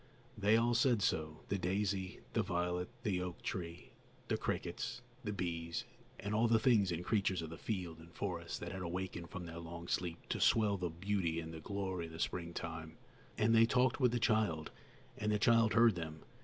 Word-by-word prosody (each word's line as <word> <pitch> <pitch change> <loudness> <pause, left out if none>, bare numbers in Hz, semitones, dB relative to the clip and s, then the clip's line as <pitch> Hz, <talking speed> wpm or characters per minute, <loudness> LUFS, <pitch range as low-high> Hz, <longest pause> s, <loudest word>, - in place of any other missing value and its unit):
They 105 +1 +4
all 120 +1 +3
said 120 -3 +3
so, 75 -3 0
the 100 - 0
daisy, 95 0 -1
the - - +3
violet, 90 -1 -1
the 95 -6 +1
oak 90 -1 -5
tree, 85 -1 -5 0.4
the - - +3
crickets, 60 0 -3 0.2
the 105 - -2
bees, 85 -3 -2 0.3
and 100 +1 -3
all 110 +2 +4
the 115 0 +5
things 110 -5 +4
and 85 +1 -3
creatures 95 -5 +1
of 80 - -6
the 80 - -7
field 90 -7 -3
and 85 +1 -13
forest 85 -2 -4
that 85 - -4
had 95 +1 -5
awakened 90 -1 -4
from 95 -3 -6
their 85 0 -7
long 85 +1 -7
sleep 85 -2 -2
to - - -1
swell 105 -3 +4
the 90 -1 -1
beauty 85 -1 -1
and 80 0 -6
the 80 - -6
glory 95 -1 -3
of 80 - -11
the 80 - -8
springtime. 85 -2 -3 0.4
And 110 +1 +4
they 115 0 +7
talked 125 +1 +3
with 125 -3 +4
the 120 - +1
child, 105 -9 +1 0.5
and 105 0 +1
the 105 - +3
child 115 0 +4
heard 115 -1 +7
them. 80 -3 -6
90 Hz, 195 wpm, -36 LUFS, 85-105 Hz, 0.5 s, they